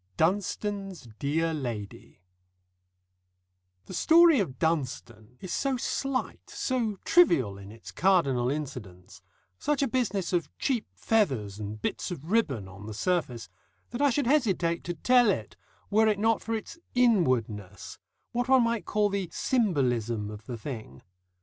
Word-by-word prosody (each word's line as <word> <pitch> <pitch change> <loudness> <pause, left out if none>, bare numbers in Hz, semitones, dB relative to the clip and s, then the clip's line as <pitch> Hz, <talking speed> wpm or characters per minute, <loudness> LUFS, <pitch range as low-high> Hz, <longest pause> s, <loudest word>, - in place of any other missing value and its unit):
DUNSTONE'S 195 - -1
DEAR 160 +3 0
LADY 115 - -6 1.6
The - - -9
story 330 - +6
of 135 -11 -2
Dunstone 125 -7 -3
is 185 - -5
so 270 -2 0
slight, 265 +1 -3
so 235 -5 -1
trivial 130 - +4
in 100 +1 -11
its 115 +1 -11
cardinal 140 -10 +2
incidents, 125 -11 -6 0.4
such 295 -2 0
a - - +2
business 210 -7 -1
of 175 -2 0
cheap 250 -5 -1
feathers 130 - 0
and 105 0 -6
bits - - -3
of 170 -1 -7
ribbon 135 - +1
on 95 +3 -11
the 110 - -6
surface, 125 - -1 0.4
that 240 +3 -4
I 285 - +5
should 280 +2 0
hesitate 195 - +1
to 175 - -3
tell 245 +6 +4
it, 195 - -2 0.4
were 220 +2 +4
it 210 -2 +2
not 225 +2 +2
for 225 - -2
its 225 +9 -7 0.2
Inwardness, 130 - +1 0.3
what 245 +2 -1
one 265 -2 +6
might 230 -2 -1
call 210 -1 +1
the 195 -3 -2
symbolism 120 - 0
of 105 0 -11
the 120 - -5
thing. 110 - -8
175 Hz, 145 wpm, -28 LUFS, -, 1.6 s, story